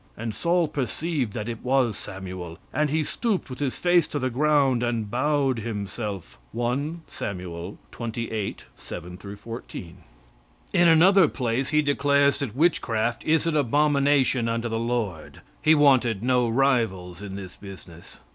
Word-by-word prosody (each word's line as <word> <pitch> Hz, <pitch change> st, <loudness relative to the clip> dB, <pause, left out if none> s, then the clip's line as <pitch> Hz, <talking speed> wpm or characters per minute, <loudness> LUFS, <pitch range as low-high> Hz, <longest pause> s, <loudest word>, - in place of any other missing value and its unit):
And 115 Hz, 0 st, -4 dB
Saul 170 Hz, +3 st, +1 dB
perceived 145 Hz, -3 st, -2 dB
that 110 Hz, -1 st, -4 dB
it 115 Hz, -2 st, -5 dB
was 125 Hz, -4 st, +2 dB
Samuel, 95 Hz, -4 st, -7 dB, 0.2 s
and 150 Hz, 0 st, +1 dB
he 155 Hz, +2 st, +1 dB
stooped 200 Hz, -, -2 dB
with 125 Hz, -, -7 dB
his 140 Hz, -3 st, -1 dB
face 175 Hz, -3 st, +3 dB
to 150 Hz, -, -4 dB
the 130 Hz, -2 st, -1 dB
ground, 140 Hz, -2 st, +3 dB
and 115 Hz, -4 st, -1 dB
bowed 135 Hz, -1 st, +1 dB
himself." 105 Hz, -, -5 dB
(1 140 Hz, +8 st, -2 dB
Saml. 90 Hz, -1 st, -6 dB, 0.2 s
xxviii, 115 Hz, -3 st, -3 dB, 0.2 s
7 90 Hz, +1 st, -8 dB, 0.2 s
14.) 105 Hz, -6 st, -8 dB, 0.8 s
In 175 Hz, -, +5 dB
another 175 Hz, +2 st, +6 dB
place 125 Hz, -1 st, -1 dB
he 150 Hz, 0 st, +3 dB
declares 140 Hz, 0 st, +3 dB
that 130 Hz, -6 st, -4 dB
witchcraft 120 Hz, -7 st, +1 dB
is 160 Hz, 0 st, +2 dB
an 165 Hz, -2 st, 0 dB
abomination 140 Hz, -2 st, +3 dB
unto 115 Hz, +1 st, -1 dB
the 115 Hz, -1 st, -2 dB
Lord. 115 Hz, -8 st, -3 dB, 0.2 s
He 155 Hz, +1 st, +5 dB
wanted 130 Hz, -8 st, +4 dB
no 125 Hz, -1 st, +2 dB
rivals 115 Hz, -9 st, +1 dB
in 100 Hz, -2 st, -7 dB
this 95 Hz, -2 st, -8 dB
business. 95 Hz, -4 st, -12 dB
120 Hz, 145 wpm, -25 LUFS, 105-145 Hz, 0.8 s, another